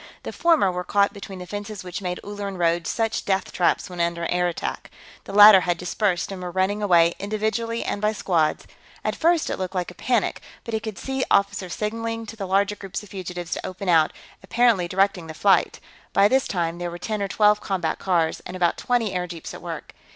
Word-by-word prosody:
The - - -6
former 325 - +3
were 180 0 -3
caught 200 +1 +2
between 200 -2 -8
the 180 - -7
fences 205 +1 -6
which 180 +1 -6
made 180 -1 -3
Ulleran 200 -1 -5
roads 170 -1 +1
such 225 -1 -1
death 190 -1 -1
traps 175 - +1
when 180 -1 -5
under 170 0 -1
air 180 0 +2
attack. 175 - -4 0.4
The - - -8
latter 205 0 +9
had 175 -1 0
dispersed, 180 +1 -1
and 190 -1 -6
were 180 - -4
running 190 +3 0
away, 170 -4 +4
individually 220 +3 -2
and 200 - -3
by 215 0 +2
squads; 170 -7 0 0.4
at - - 0
first, 335 0 +2
it - - -2
looked 185 0 -4
like 180 -1 -2
a - - -12
panic, 240 +2 0 0.2
but 230 - -7
he 220 - +1
could 215 -3 -6
see 265 +4 -2
officers 200 -2 +1
signaling 225 +1 -3
to 220 +1 -9
the 200 -3 -5
larger 200 +2 +2
groups 195 0 -6
of 210 - -14
fugitives 180 -3 -6
to - - -3
open 185 +1 -5
out, 160 -2 +4 0.3
apparently 215 -2 +2
directing 190 -2 +1
the 160 - -8
flight. 195 +4 +3 0.3
By 200 +1 +6
this 265 +4 +2
time, 170 -2 -2
there 175 0 -3
were 170 - -7
ten 210 +4 -3
or 200 - 0
twelve 210 +1 +3
combat 185 -5 -2
cars 170 -4 +1
and 185 - -7
about 175 -1 +1
twenty 235 -5 0
airjeeps 180 -3 -5
at - - -9
work. - - -7
195 Hz, 215 wpm, -24 LUFS, 180-210 Hz, 0.4 s, latter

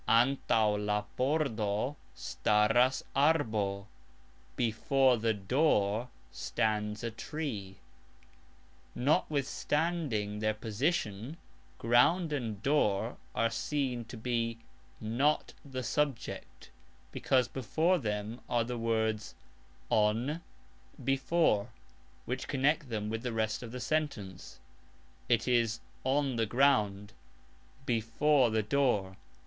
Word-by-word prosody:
"Antaux 115 -3 +3
la 105 0 0
pordo" 125 -4 0 0.2
staras 105 - +2
arbo, 110 -10 +2 0.7
"Before 125 +3 +2
the 115 0 +1
door" 110 0 +1 0.2
stands 105 - -1
a 115 - -2
tree. 110 -7 -5 1.2
Notwithstanding 145 -4 0
their 110 0 0
position, 115 - -2 0.4
"ground" 150 +8 +3
and 110 -7 -3
"door" 120 -9 +1 0.2
are 115 0 +2
seen 130 -5 -1
to 120 - -9
be 115 0 -1 0.4
not 135 +8 +1
the 130 -2 -5
subject, 135 - -3 0.4
because 130 -2 +2
before 160 +8 +1
them 105 -1 -3
are 120 -1 +2
the 120 0 -4
words 110 -2 -1 0.6
"on," 115 +9 +2 0.6
"before," 135 -4 +2 0.6
which 125 +1 -3
connect 145 +1 +1
them 105 -2 -2
with 115 0 -3
the 125 -1 -3
rest 110 -1 -1
of 115 -2 -7
the 125 - -5
sentence 120 - -3 0.7
it 115 -1 +2
is 115 -3 +2 0.2
"on 135 -1 +1
the 115 -1 +1
ground," 105 -6 +2 0.7
"before 120 +4 +2
the 110 -1 +1
door." 105 -6 +1
115 Hz, 100 wpm, -31 LUFS, 105-140 Hz, 1.2 s, Antaux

